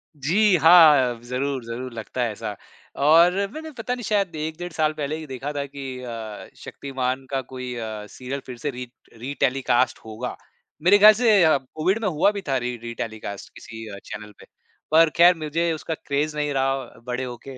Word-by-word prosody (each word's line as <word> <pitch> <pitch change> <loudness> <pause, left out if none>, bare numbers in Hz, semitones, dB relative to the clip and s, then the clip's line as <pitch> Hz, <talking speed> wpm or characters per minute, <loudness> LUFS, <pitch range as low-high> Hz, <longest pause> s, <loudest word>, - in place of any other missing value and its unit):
जी, 180 +8 +3
हाँ, 150 -7 +6
ज़रूर, 130 +1 -3
ज़रूर 120 +2 -6
लगता 115 +2 -5
है 115 - -1
ऐसा। 105 0 -6 0.5
और 165 +4 +7 0.2
मैंने 315 0 -7
पता 240 +2 -2
नहीं 245 - -8
शायद 200 -5 0
1, 155 +1 -4
डेढ़ 175 0 -6
साल 155 -1 +1
पहले 150 0 -3
ही 160 - -8
देखा 135 +2 -5
था 140 -1 -2
कि 140 0 -10 0.2
अ, 115 -3 -7
शक्तिमान 130 -1 -4
का 135 -1 0
कोई 125 -1 -7
अ, 110 -2 -5
सीरियल 130 +2 -6
फिर 125 -2 -8
से 145 - -3
रीट 125 -1 -8 0.2
रीटेलीकास्ट 130 0 0
होगा। 110 +3 -5 0.5
मेरे 200 +3 +7
ख्याल 215 +1 +9
से 215 -4 +4
अ, 155 -3 +5
कोविड 155 - -2
में 215 - 0
हुआ 170 +4 +3
भी 200 -1 -5
था 135 - +2
री 125 0 -3
रीटेलीकास्ट 110 -3 -6
किसी 110 0 -9
अ, 100 -2 -8
चैनल 105 0 -8
पे, - - -14 0.5
पर 165 0 +6
खैर 175 +1 +7
मुझे 165 +3 0
उसका 160 +1 -4
क्रेज़ 150 +1 -2
नहीं 150 -1 -1
रहा 135 0 +1 0.3
बड़े 125 +1 -2
होके। 130 +1 -8
140 Hz, 190 wpm, -23 LUFS, 125-160 Hz, 0.5 s, ख्याल